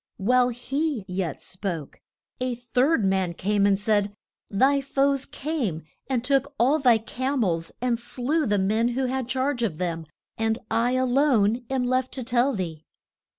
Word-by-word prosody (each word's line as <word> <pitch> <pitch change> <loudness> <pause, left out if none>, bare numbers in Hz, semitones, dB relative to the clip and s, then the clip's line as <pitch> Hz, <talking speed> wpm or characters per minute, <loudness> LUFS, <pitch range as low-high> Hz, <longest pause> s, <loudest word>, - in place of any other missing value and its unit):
While 250 +5 +3
he 260 0 -2
yet 180 -5 -3
spoke, 180 -6 -5 0.4
a 255 -1 -1
third 245 +1 +1
man 190 -3 +1
came 200 +2 +2
and 195 -1 +3
said, 205 -1 +1 0.4
Thy 270 +7 +3
foes 275 0 +1
came 260 - -3 0.2
and 255 -3 -1
took 280 +2 +1
all 270 +7 +4
thy 245 -5 +5
cam 255 +4 -2
els, 165 -4 -1
and 240 -2 +1
slew 270 +6 -1
the 205 -1 +2
men 215 +4 +2
who 265 - +1
had 255 -1 -2
charge 260 0 -1
of 195 -10 -1
them, 165 -2 -3 0.3
and 225 0 +1
I 240 +2 +2
a 255 0 +2
lone 245 -4 +2
am 265 -1 0
left 255 +1 0
to 260 - -3
tell 245 +3 +2
thee. 165 -5 -4
245 Hz, 165 wpm, -25 LUFS, 200-265 Hz, 0.4 s, thy